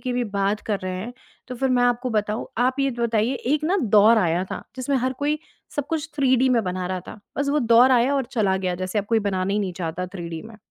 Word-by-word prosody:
की 250 -2 -3
भी 245 - 0
बात 200 +1 0
कर 210 -2 0
रहे 185 0 -4
हैं 230 +6 -6 0.4
तो 255 - -5
फिर 265 +2 0
मैं 250 -1 +3
आपको 245 +1 +1
बताऊँ, 210 0 -1
आप 255 +2 +2
ये 275 0 +2
बताइए 235 +1 +1 0.2
एक 305 0 +1
ना 360 +5 +2 0.2
दौर 215 +2 +7
आया 175 -2 +1
था - - -5
जिसमें 260 +2 0
हर 255 +1 0
कोई 300 +1 +1 0.4
सब 290 -1 -1
कुछ 320 -1 -3
थ्रीडी 260 -2 +3
में 235 -3 +3
बना 180 0 -3
रहा 185 0 -3
था। 210 - -10 0.2
बस 280 0 0
वो 295 - +2 0.2
दौर 250 +3 +7
आया 250 +3 +3
और 270 -2 +1
चला 200 -6 +2
गया 185 -2 -1
जैसे 185 +3 -2
अब 200 - -1
कोई 225 +1 +2
बनाना 190 0 -1
ही 205 - +1
नहीं 195 -3 -2
चाहता 175 +1 -4
थ्रीडी 170 -3 -6
में। 225 0 -12
230 Hz, 250 wpm, -23 LUFS, 190-260 Hz, 0.4 s, दौर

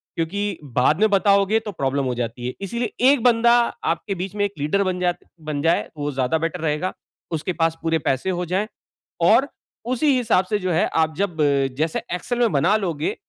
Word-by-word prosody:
क्योंकि 200 +3 -2
बाद 130 - +1
में 215 - +5
बताओगे 200 +2 +3
तो 215 -2 -6
प्रॉब्लम 135 -4 -1
हो 125 - -1
जाती 120 +1 -4
है। 125 - -3
इसीलिए 235 +5 -3 0.2
1 275 -5 +1
बंदा 235 -1 +5 0.4
आपके 195 - -5
बीच 190 +2 -5
में 205 0 +1
1 200 - -4
लीडर 175 +8 +1
बन 185 -1 -2
जा 180 -1 +1 0.3
बन 150 -2 -3
जाए, 165 +2 +1
वो 145 0 -2
ज़्यादा 130 +3 0
बेटर 165 +2 -3
रहेगा। 160 +4 -1 0.4
उसके 165 +3 -2
पास 165 -1 0
पूरे 165 -1 +1
पैसे 135 +8 0
हो 180 -1 -1
जाएँ 190 +5 -1 0.5
और 230 +11 +5 0.5
उसी 300 +5 0
हिसाब 220 -6 +2
से 210 +2 -1
जो 185 -1 -2
है, 165 - +2
आप 160 -1 0
जब 175 -6 -1
अ, 140 -2 +3
जैसे 155 +2 0 0.2
एक्सेल 245 +7 -3
में 235 -3 +3
बना 170 +9 +3
लोगे, 165 -7 -2
180 Hz, 205 wpm, -22 LUFS, 150-205 Hz, 0.5 s, में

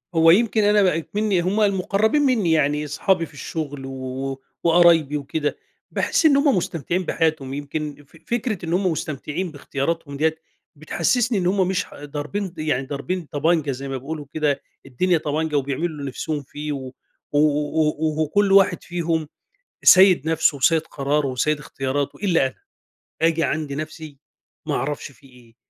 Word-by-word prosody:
هو 165 0 +6
يمكن 220 +2 +3
أنا 205 0 +4
بقى 180 -4 +3
إكمني 205 +2 0
هُم 200 +5 0
المقرَّبين 200 +6 +2
مِنِّي 240 - +2
يعني، 150 -1 +2
أصحابي 170 +4 +1
في - - -18
الشغل 145 -1 -5
و 135 - -6 0.4
و 135 - -7 0.2
وقرايبي 165 -3 +5
وكده، 145 +1 -3 0.3
باحس - - +1
إن 285 -3 +6
هُم 280 -4 +3
مستمتِعين 175 +1 -2
بحياتهم. 155 -5 0
يمكن 145 +1 -5
ف 165 - -19
فكرة 225 -6 -2
إن 165 - -2
هُم 185 -1 +2
مستمتِعين 155 +3 -4
باختياراتهم 140 0 -3
ديَّة، 160 +1 +1 0.4
بتحسِّسني 205 - 0
إن 180 -1 0
هُم 190 -1 +2
مش 190 0 0
ح - - -14
ضاربين 155 +6 -4
يعني 145 -4 -1
ضاربين 160 +5 -3
طَبَنجة، 150 0 +1
زي 135 +1 -6
ما 135 -1 -3
بيقولوا 150 +3 -6
كده، 150 -3 0 0.2
الدنيا 175 +7 +1
طَبَنجة، 155 0 -2
وبيعملوا 140 +4 -1
اللي 150 -3 -8
نفسهم 145 +3 -3
فيه، 150 +3 -6
و 130 -2 -5 0.4
و 145 - 0
و 150 +1 +2
و 155 0 -1
وكل 200 +6 +1
واحد 195 -3 +4
فيهم 165 -3 -2 0.6
سيِّد 185 -5 +7
نفسه 160 -2 +2
وسيِّد 160 +4 +3
قراره 140 +1 -1
وسيِّد 135 +4 0
اختياراته. 140 0 -3
إلا 175 -9 +2
أنا، 130 - -6 0.7
آجي 165 0 +3
عند 155 -3 -2
نفسي، 155 -1 -7 0.5
ما - - -1
أعرفش 145 +2 -3
في 135 - -20
إيه! 120 -3 -20
155 Hz, 165 wpm, -22 LUFS, 145-180 Hz, 0.7 s, سيِّد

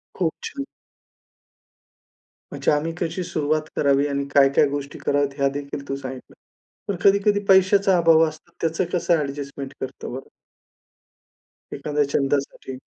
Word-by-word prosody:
खूप 170 -4 0
छान. 280 -1 -5 1.9
म्हणजे - - 0
आम्ही 150 +2 0
कशी 175 +2 -2
सुरुवात 155 -1 -1
करावी 140 0 +2
आणि 140 0 -1
काय-काय 140 +1 +5
गोष्टी 140 0 -5
कराव्यात 140 -1 0
ह्या 140 0 +2
देखील 140 0 -6
तू 135 - -1
सांगितलं. 130 -1 -8 0.5
पण 200 - -1
कधी-कधी 200 +1 +4
पैशाचा 190 0 +5
अभाव 165 -1 +5
असतो, 155 +2 -10
त्याचं 165 +2 0
कसं 175 -1 +2
ॲडजस्टमेंट 140 -1 -5
करतो 130 - -6
बरं 130 +1 -8 1.5
एखाद्या 150 -1 0
छंदासाठी. 135 -1 -1
145 Hz, 125 wpm, -23 LUFS, 140-170 Hz, 1.9 s, काय-काय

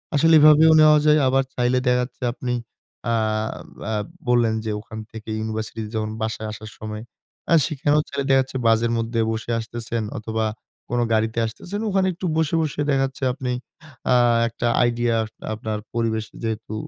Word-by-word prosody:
আসলে 165 +3 +5
এভাবেও 155 +1 +7
নেওয়া 150 0 +7
যায়, 150 0 +5
আবার 135 +1 +3
চাইলে 125 +1 +2
দেখা 125 - +4
যাচ্ছে 125 +1 -9
আপনি 125 0 -3 0.6
আ - - +3 0.8
আব 105 -1 -1 0.2
বললেন 120 -2 +3
যে 110 - -1
ওখান 110 +1 -9
থেকে 110 -1 -9
ইউনিভার্সিটিতে 110 0 -4
যখন 110 0 -1
বাসায় 110 0 -3
আসার 110 0 -8
সময় 105 0 -6 0.5
আ - - +6
সেখানেও 150 -1 +1
চাইলে 140 -1 -3
দেখা 135 - +5
যাচ্ছে 130 0 -5
বাসের 115 +1 +3
মধ্যে 115 0 -1
বসে 110 +1 -4
আসতেছেন 115 0 -4
অথবা 110 +1 -2 0.4
কোন 120 0 0
গাড়িতে 110 +1 +1
আসতেছেন 180 - -5
ওখানে 190 -1 +2
একটু 180 +2 -6
বসে, 160 0 +1
বসে 150 -1 -2
দেখা 135 -1 +3
যাচ্ছে 135 0 -7
আপনি 130 -2 -3 0.6
আ - - +5 0.3
একটা 115 +1 -3 0.2
আইডিয়া, 120 -1 +1 0.4
আপনার 110 0 -4
পরিবেশে 110 -2 -1
যেহেতু 110 -1 -3
120 Hz, 165 wpm, -23 LUFS, 110-135 Hz, 0.8 s, এভাবেও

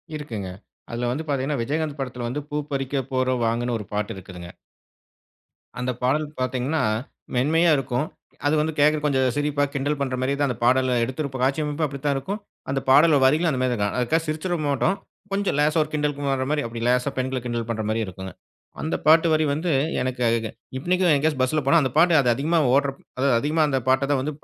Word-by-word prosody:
இருக்குங்க. 110 -11 -5 0.4
அதுல 120 +1 -2
வந்து 155 +5 -3
பார்த்தீங்கன்னா, 140 -1 -1
விஜயகாந்த் 150 +2 -2
படத்தில 125 -2 -4
வந்து 145 +4 -3
பூ 150 - -3 0.2
பறிக்க 135 0 -1
போறோம் 130 -2 +1
வாங்கன்னு 120 +1 0
ஒரு 105 - -7
பாட்டு 105 +2 -2
இருக்குதுங்க. 90 -2 -10 1.3
அந்த 125 +1 -1
பாடல் 150 +4 +2
பார்த்தீங்கன்னா, 130 +5 -1 0.5
மென்மையா 160 +6 +3
இருக்கும். 130 +2 -1 0.4
அது 155 - +3
வந்து 160 +1 0
கேட்கிற 150 +1 +4
கொஞ்சம் 130 -3 +2
சிரிப்பா 145 0 0
கிண்டல் 145 +1 -1
பண்றமாரியே 130 0 -1
தான் 140 -2 +2
அந்த 125 - -3
பாடல 130 0 +3
எடுத்திருப்ப 130 +2 -3
காட்சி 135 +4 +1
அமைப்பும் 150 +1 -1
அப்பிடித்தான் 140 0 -2
இருக்கும். 195 +10 -4 0.3
அந்த 135 0 0
பாடல் 150 +3 +6
வரிகளும் 160 +5 +3
அந்தமாதிரி 130 -1 0
தான் 110 - -3
இருக்கும். 100 +5 -1
அதுக்காக 160 +7 +1
சிரிச்சிற 165 +3 -2
மாட்டோம். 145 +7 +1 0.4
கொஞ்சம் 200 -7 0
லேசா 155 +2 +3
ஒரு 150 - -10
கிண்டலுக்கு 145 -2 -1
வர்றமாரி 145 +3 -1
அப்பிடி 115 0 -5
லேசா 125 +2 +2
பெண்கள 130 0 -1
கிண்டல் 120 -1 -3
பண்றமாரி 110 0 -1
இருக்குங்க. 95 0 -8 0.5
அந்த 160 - -1
பாட்டு 160 +2 +6
வரி 155 0 +3
வந்து, 165 +3 -1 0.3
எனக்கு 125 -1 -3
அ - - +4
க - - +1
க - - -3 0.3
இன்னிக்கும் 180 +2 +2
எங்கயாச்சும் 145 -2 +1
பஸ்ல 150 +4 +1
போனா, 165 +2 +5
அந்த 130 - -1
பாட்டு 170 +1 +5
அது 125 - +1
அதிகமா 160 +4 +1 0.2
ஓட்றப்போ 140 -1 0 0.2
அதாவது 135 -3 +3
அதிகமா 155 +4 +1
அந்த 135 -1 +1
பாட்ட 135 +1 +3
தான் 135 -2 +2
வந்து 150 +1 -3
135 Hz, 190 wpm, -24 LUFS, 125-150 Hz, 1.3 s, பாடல்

